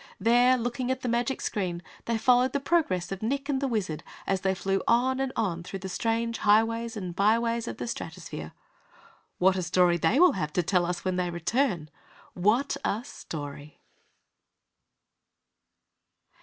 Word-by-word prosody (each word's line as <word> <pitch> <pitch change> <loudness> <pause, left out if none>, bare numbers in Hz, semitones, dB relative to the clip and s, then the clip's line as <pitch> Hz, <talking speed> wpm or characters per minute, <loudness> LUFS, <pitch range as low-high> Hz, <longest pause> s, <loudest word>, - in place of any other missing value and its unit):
There, 245 +3 +4
looking 245 +1 -2
at 260 0 -1
the - - -3
magic 240 +2 0
screen, 180 -5 -2 0.2
they 230 -1 0
followed 250 +3 +3
the 280 - +1
progress 270 - 0
of 195 - -4
Nick 275 +5 -1
and 275 -2 0
the 275 - +1
Wizard 195 - -2 0.2
as 195 -1 0
they 190 0 +1
flew 195 0 -1
on 255 +3 +3
and 270 -1 -1
on 175 -6 -1
through 185 +3 -6
the 190 0 -7
strange 230 +2 -1
Highways 225 +2 +2
and 180 -4 -5
Byways 230 +3 +2
of - - -5
the - - -4
Stratosphere. 230 - -6 0.9
What 190 +1 +3
a - - 0
story 175 0 +3
they 185 - +3
will 360 0 +7
have 155 -5 -3
to 180 - +1
tell 175 0 +2
us 175 0 -4
when 185 -1 0
they 180 -1 0
return.... 175 - 0 0.5
WHAT 215 +10 +1
a 215 +4 -1
story! 145 -1 -8
215 Hz, 165 wpm, -27 LUFS, 180-245 Hz, 0.9 s, will